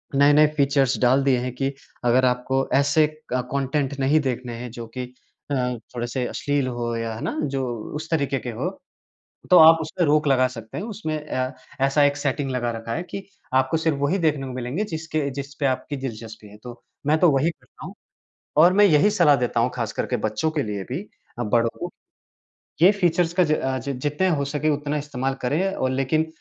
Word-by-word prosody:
नए-नए 145 +2 +6
फ़ीचर्स 140 -2 +2
डाल 130 +2 +4
दिए 135 -2 +3
हैं 125 0 -4
कि 135 +1 -1 0.3
अगर 125 +2 +4
आपको 130 +2 0
ऐसे 140 +3 +4 0.3
क 125 0 0
कॉन्टेंट 140 0 -1
नहीं 140 +3 +3
देखने 125 -3 -3
हैं, 125 +1 -6
जो 115 0 -8
कि 125 - -2 0.5
अ, - - +1 0.4
थोड़े-से 120 +1 -2
अश्लील 145 -2 -1
हों 120 -1 -3
या 115 -1 -3
है 110 - -8
ना, - - -3
जो 135 -2 -1 0.3
उस 155 +2 -6
तरीके 140 -4 0
के 120 - -6
हों, 110 - -2 0.8
तो 180 - +7
आप 160 +1 +9
उस 155 - -5
पे 180 - +3
रोक 150 +1 +3
लगा 130 -2 +4
सकते 115 -3 -9
हैं। - - -3
उसमें 205 -8 -4
अ, 130 -2 -2 0.3
ऐसा 140 +2 +3
एक 145 0 +2
सेटिंग 140 -1 -1
लगा 120 -2 -1
रखा 115 0 -5
है 170 - -3
कि 195 +2 -7 0.3
आपको 130 +4 +2
सिर्फ़ 160 -2 0
वही 145 +7 +1
देखने 150 -5 0
को 130 - -6
मिलेंगे, 130 - -3
जिसके 160 -6 -3
जिस 140 +1 -6
पे 145 - 0
आपकी 135 +2 -1
दिलचस्पी 115 -4 -7
है, 105 +1 -14
तो 120 -1 -10 0.3
मैं 155 +1 +4
तो 175 - +6
वही 140 +4 +2
करता - - -15
हूँ। - - -8 0.6
और 170 +4 +7
मैं 205 +2 +5
यही 170 +1 +5
सलाह 170 -8 +4
देता 120 -2 0
हूँ, 120 +2 +2
खासकर 115 -3 -2
के 125 - -1
बच्चों 110 +8 -1
के 155 -2 -1
लिए 105 -4 -4
भी 140 - -2 0.4
अ, - - -1
बड़ों 115 +1 +2
को, - - -5 0.9
ये 180 - +9
फ़ीचर्स 175 -4 +1
का - - +6
ज 155 - 0
अ, 130 -3 -1
जि 140 - -4
जितने 150 +8 0
हो 150 -5 +1
सके, 150 +2 -1
उतना 145 0 -1
इस्तेमाल 135 -2 -3
करें 165 +10 0
और 130 - -1
लेकिन 135 +4 +1
140 Hz, 210 wpm, -23 LUFS, 125-155 Hz, 0.9 s, आप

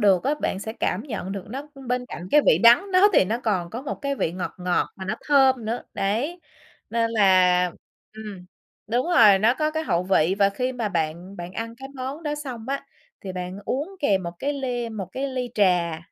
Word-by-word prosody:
được 195 -4 +4
á, 290 +3 +2
bạn 190 - -1
sẽ 220 +2 -5
cảm 190 -3 -1
nhận 210 -8 -5
được 195 -2 -5
nó 275 +5 -6 0.2
bên 250 0 -1
cạnh 180 -6 -8
cái 300 - +6
vị - - +6
đắng 350 +13 +6
đó 380 +3 +6
thì - - +5
nó 220 +5 -1
còn 185 -6 -1
có 240 +4 -6
một 280 - -3
cái 280 0 -1
vị 165 -10 -1
ngọt 180 0 -5
ngọt 180 0 0
mà 190 - -7
nó 195 - -2
thơm 265 -4 +4
nữa, 225 +3 -3
đấy. 255 - -1 0.5
Nên 230 0 +1
là 185 -4 +4 0.5
ừm, 210 -4 -9 0.4
đúng 240 +7 0
rồi, 220 - +6
nó 225 +5 +3
có 305 +1 0
cái 315 0 -2
hậu 170 - +1
vị 185 -1 +2
và 200 -1 +4
khi 250 +5 -2
mà 235 -4 -2
bạn 170 +2 -3
bạn 175 +1 -7
ăn 230 +2 -5
cái 270 +2 -9
món 270 +5 -5
đó 295 -1 -2
xong 260 -6 -7
á, 275 0 -3 0.3
thì 190 -2 -6
bạn 180 +1 -5
uống 305 - -3
kèm 195 - +2
một 170 0 -5
cái 285 - -1
ly 250 -4 -3
một 210 -5 -5
cái 275 +1 -2
ly 255 -2 -3
trà, 175 -5 +2
225 Hz, 225 wpm, -24 LUFS, 190-265 Hz, 0.5 s, cái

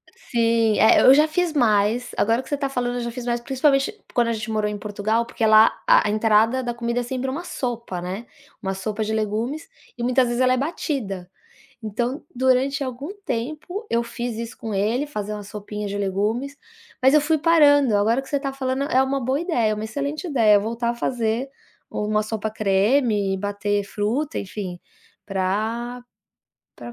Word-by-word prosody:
Sim, 230 -2 +1
é, 220 - +6
eu 260 - +8
já 300 +3 +5
fiz 335 +1 0
mais. 230 -2 +2
Agora 230 +3 +2
que 260 - -16
você 290 - 0
tá 275 -1 -2
falando, 245 -2 -2
eu 245 - -2
já 235 0 -3
fiz 245 0 -7
mais, 240 -1 0
principalmente 275 - +1 0.2
quando 240 -2 +2
a - - +1
gente 220 0 -5
morou 215 -1 0
em 210 - -4
Portugal, 210 +3 -1
porque 230 -1 -2
lá 215 0 +7
a - - +5
a - - 0
entrada 220 +4 +3
da 240 -1 -2
comida 235 0 -2
é - - -4
sempre 260 +2 -3
uma 300 +7 -4
sopa, 235 - -4
né. 190 +6 -5 0.4
Uma 190 -1 -2
sopa 210 +3 -3
de 215 +1 -2
legumes 220 +8 -2 0.3
e 240 - -4
muitas 250 +1 +3
vezes 240 +1 -1
ela 255 0 +4
é - - +1
batida. 255 - -3 0.5
Então, 240 +7 -3
durante 260 +2 +2
algum 260 +2 -5 0.2
tempo, 310 - -4
eu 235 - +1
fiz 235 0 -5
isso 230 0 -6
com 220 -3 -5
ele, 225 +9 0
fazer 210 -7 -5
uma 210 -1 -6
sopinha 210 +1 -6
de 200 - -4
legumes, 210 +8 -1 0.4
mas 265 +2 +5
eu 305 - +7
fui 310 +2 +1
parando. 290 -7 +5
Agora 225 +5 +2
que 270 - -13
você 285 - -1
tá 275 -1 -3
falando, 265 0 -2
é 260 - +4
uma 265 -1 -1
boa 265 +3 0
ideia, 240 - +1
uma 210 - -5
excelente 285 - -4
ideia 225 -9 +4
voltar 230 +3 -2
a - - -3
fazer 235 +1 -1 0.4
uma 210 0 0
sopa 215 0 -3
creme, 210 0 +2
bater 205 +1 -1
fruta, 225 +9 -2
enfim, 185 -3 -6 0.4
pra 220 +6 -2 0.7
pra 240 - -9
235 Hz, 190 wpm, -23 LUFS, 210-265 Hz, 0.7 s, eu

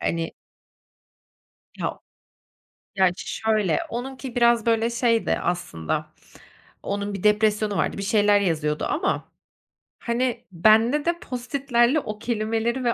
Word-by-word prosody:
Hani 165 -1 -2 1.5
Ya, - - -3 1.0
gerçi 190 -2 +1
şöyle: 215 -7 +1
Onunki 255 +1 -6
biraz, 235 -1 +4
böyle, 230 0 +2
şeydi 235 -1 +1
aslında; 80 - -3 0.7
onun 200 0 -3
bir 195 - -6
depresyonu 210 -1 +2
vardı, - - -1
bir - - -3
şeyler 205 0 +3
yazıyordu 155 -5 0
ama, 345 +6 -1 0.8
hani, 240 +1 -1
bende 225 - +4
de 340 0 0
Post-it'lerle 250 +1 +1
o 215 -5 -6
kelimeleri 230 +2 -1
ve 235 -1 +2
220 Hz, 110 wpm, -24 LUFS, 200-240 Hz, 1.5 s, biraz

